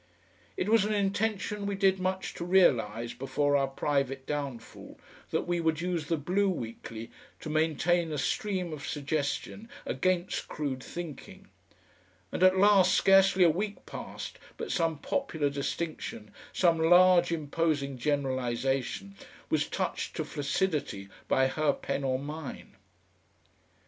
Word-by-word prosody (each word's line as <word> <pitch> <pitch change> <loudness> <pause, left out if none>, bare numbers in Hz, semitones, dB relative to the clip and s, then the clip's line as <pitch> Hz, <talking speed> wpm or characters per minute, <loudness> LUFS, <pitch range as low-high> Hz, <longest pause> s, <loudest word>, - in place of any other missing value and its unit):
It 185 - -1
was 220 -1 +5
an 210 +1 0
intention 205 0 -1
we 200 - -1
did 190 -1 +3
much 185 +1 -2
to - - -6
realise 120 - +3
before 145 +2 0
our 135 -1 +3
private 135 -1 -1
downfall, 140 -5 -6 0.3
that - - -1
we 175 0 0
would 160 -1 +1
use 170 -3 -2
the 165 - +1
BLUE 190 +7 +1
WEEKLY 115 -6 -6 0.3
to - - -7
maintain 160 +2 +1
a 150 - -2
stream 185 +3 -1
of 145 -2 -7
suggestion 145 +9 -3 0.2
against 185 -1 -1
crude 140 -4 -3
thinking, 170 -5 -8 0.8
and - - -4
at 185 0 +6
last 195 -2 +5
scarcely 195 -1 +5
a 170 - +6
week 200 +5 -4
passed - - -7 0.2
but - - -4
some 165 -3 +1
popular 155 - -1
distinction, 140 -6 -4 0.2
some 170 -3 +3
large 175 +1 +6
imposing 150 -3 -1
generalisation, 130 -5 -1 0.4
was - - +2
touched - - -3
to - - -2
flaccidity 145 - -2 0.2
by 130 - +3
her 145 +2 +1
pen 140 - -3
or 130 -1 +1
mine.... 145 +1 -7
160 Hz, 135 wpm, -29 LUFS, 140-185 Hz, 0.8 s, at